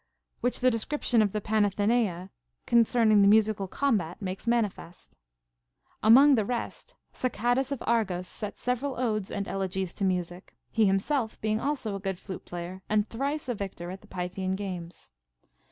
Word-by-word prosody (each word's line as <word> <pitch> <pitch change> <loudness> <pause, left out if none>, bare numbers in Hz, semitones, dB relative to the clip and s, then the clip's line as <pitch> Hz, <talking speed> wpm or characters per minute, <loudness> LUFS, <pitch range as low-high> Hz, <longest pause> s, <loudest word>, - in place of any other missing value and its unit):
Which 245 +1 -1
the 255 0 +5
description 235 0 +1
of 205 -2 +2
the 210 - -1
Panathenaea 205 -2 +1 0.3
concerning 230 -2 +4
the 200 - +6
musical 210 -1 +3
combat 205 -8 0
makes 190 +2 -5
manifest. 210 -7 -2 0.9
Among 270 +6 +7
the 225 -5 +3
rest, 240 +3 -5 0.2
Sacadas 245 +2 0
of 280 - -3
Argos 195 -6 0
set 210 +2 -5
several 250 +1 -2
odes 215 -5 -1
and 200 -1 -3
elegies 190 -1 -2
to 200 - -5
music, 180 -1 -2 0.2
he 220 -2 +3
himself 220 +5 0
being 215 0 0
also 265 -7 -2
a - - -4
good 190 -1 -3
flute 190 0 -8
player 175 +2 -7
and 210 0 +2
thrice 280 +5 -2
a 245 - 0
victor 190 -4 -6
at 190 - -8
the - - -18
Pythian 185 +1 -3
games. 180 - -7
210 Hz, 155 wpm, -28 LUFS, 190-235 Hz, 0.9 s, Among